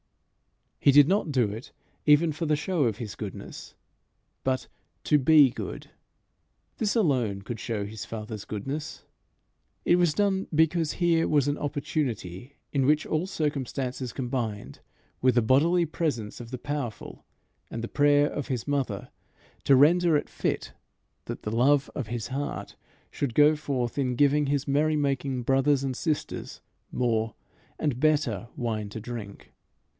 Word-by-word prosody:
He 140 - +5
did 145 +1 +7
not 190 -4 +1
do 125 -5 +2
it 110 +4 -8 0.4
even 150 +2 +5
for 160 +2 -3
the 150 - +3
show 160 -1 0
of 110 -3 0
his 110 -4 -6
goodness, 105 -3 -8 0.7
but 130 -1 -1 0.4
to 150 - +3
be 145 -1 +6
good. - - -7 0.9
This 210 0 0
alone 125 - +1
could 115 +1 -6
show 105 -3 -3
his 105 +1 -7
Father's 110 -2 -6
goodness. 140 +9 -5 0.8
It 175 - +5
was 175 -4 +2
done 195 -2 +1
because 160 0 +2
here 170 -2 +2
was 145 -2 +2
an 145 0 -1
opportunity 140 - -3 0.2
in 135 -2 +2
which 150 +1 +3
all 160 +4 -1
circumstances 135 -6 -3
combined 115 - -4 0.4
with 130 -1 +3
the 120 - +4
bodily 165 +9 +4
presence 145 -9 -3
of 115 - -9
the 130 - -5
powerful 140 -4 -5 0.5
and 115 - -5
the - - -2
prayer 145 +1 +4
of 145 - -4
his 125 -2 -3
mother, 135 -9 -2 0.5
to 140 - +6
render 165 +4 +5
it - - -3
fit - - -3 0.5
that - - -6
the 105 - -3
love 140 +3 +3
of 130 -7 -4
his 115 -1 -4
heart 140 +2 -4 0.4
should 130 -5 -3
go 150 +1 +6
forth 135 -4 -2
in 125 -2 0
giving 145 +2 +3
his 140 0 0
merry 150 +3 +2
making 135 -3 -1
brothers 135 +2 +2
and 130 -2 -2
sisters 155 +2 -3 0.3
more 115 -3 0 0.4
and 140 -5 -1
better 145 -7 +1
wine 110 -4 -3
to 110 - -6
drink. 110 -3 -8
140 Hz, 150 wpm, -27 LUFS, 120-150 Hz, 0.9 s, did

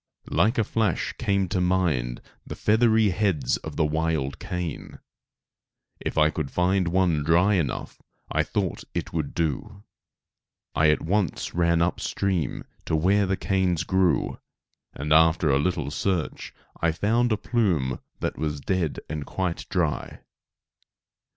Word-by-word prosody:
Like 115 +4 +2
a 110 - +3
flash 105 -4 0
came 100 -1 +1
to 95 -1 0
my 90 -1 +2
mind - - -4 0.2
the - - -7
feathery 110 -1 +3
heads 90 - +1
of 80 -2 -8
the 80 - +2
wild 80 -3 -1
cane. 90 -4 -5 1.0
If - - -4
I 75 0 +5
could 75 -3 -3
find 90 +2 +1
one 85 -4 +2
dry 85 +6 +4
enough 85 -9 -2 0.3
I - - +2
thought - - -2
it - - -3
would 80 -4 -3
do. 100 +6 -2 0.9
I 80 -1 +4
at 75 - +2
once 95 +2 -1
ran 85 -1 +3
up 90 - -1
stream 90 -8 -1 0.2
to - - 0
where 95 +5 +3
the 95 0 0
canes 95 -4 +1
grew, 95 -2 +1 0.5
and 75 +2 -1
after 80 -1 +4
a 70 - +3
little 75 -3 -1
search 90 0 -2 0.3
I 85 - +3
found 115 +8 +1
a 110 - +2
plume 85 - 0 0.2
that - - -2
was 75 -2 -2
dead 85 +1 -1
and 75 -1 -4
quite 90 +2 -3
dry. 85 -6 -1
85 Hz, 145 wpm, -25 LUFS, 75-95 Hz, 1.0 s, I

